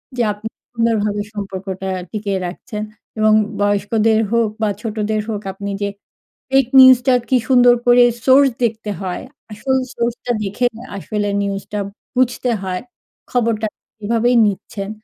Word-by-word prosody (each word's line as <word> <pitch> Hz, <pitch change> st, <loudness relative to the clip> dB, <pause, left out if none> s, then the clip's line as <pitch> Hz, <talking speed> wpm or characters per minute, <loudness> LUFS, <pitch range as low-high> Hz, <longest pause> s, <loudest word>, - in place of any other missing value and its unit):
যে, 245 Hz, -, 0 dB
আপনি 210 Hz, +2 st, -7 dB, 0.2 s
সুন্দরভাবে 220 Hz, -3 st, 0 dB
সম্পর্কটা 190 Hz, -2 st, -5 dB, 0.2 s
টিকিয়ে 200 Hz, -3 st, -2 dB
রাখছেন 210 Hz, +4 st, -6 dB, 0.4 s
এবং 215 Hz, 0 st, +4 dB, 0.3 s
বয়স্কদের 210 Hz, +2 st, +2 dB
হোক 235 Hz, -2 st, +2 dB
বা 215 Hz, -, +2 dB
ছোটদের 215 Hz, -1 st, -2 dB
হোক, 210 Hz, -2 st, -3 dB
আপনি 200 Hz, +1 st, -5 dB
যে, 200 Hz, -, 0 dB, 0.6 s
ফেক 270 Hz, -1 st, +4 dB
নিউজটা 260 Hz, 0 st, +7 dB, 0.2 s
কী 260 Hz, -, +3 dB
সুন্দর 245 Hz, -2 st, +6 dB
করে 245 Hz, 0 st, +7 dB, 0.2 s
সোর্স 270 Hz, +1 st, +6 dB
দেখতে 220 Hz, -2 st, -2 dB
হয়, 185 Hz, -2 st, -4 dB, 0.3 s
আসল 265 Hz, +5 st, -1 dB, 0.2 s
সোর্সটা 240 Hz, +1 st, -2 dB
দেখে 205 Hz, +5 st, 0 dB, 0.3 s
আসলে 205 Hz, +1 st, -2 dB
নিউজটা 200 Hz, +1 st, -4 dB, 0.4 s
বুঝতে 250 Hz, 0 st, +1 dB
হয় 185 Hz, -1 st, -3 dB, 0.5 s
খবরটা 230 Hz, -3 st, 0 dB, 0.4 s
এভাবেই 235 Hz, +3 st, +2 dB
নিচ্ছেন। 200 Hz, 0 st, -4 dB
215 Hz, 130 wpm, -18 LUFS, 205-240 Hz, 0.6 s, নিউজটা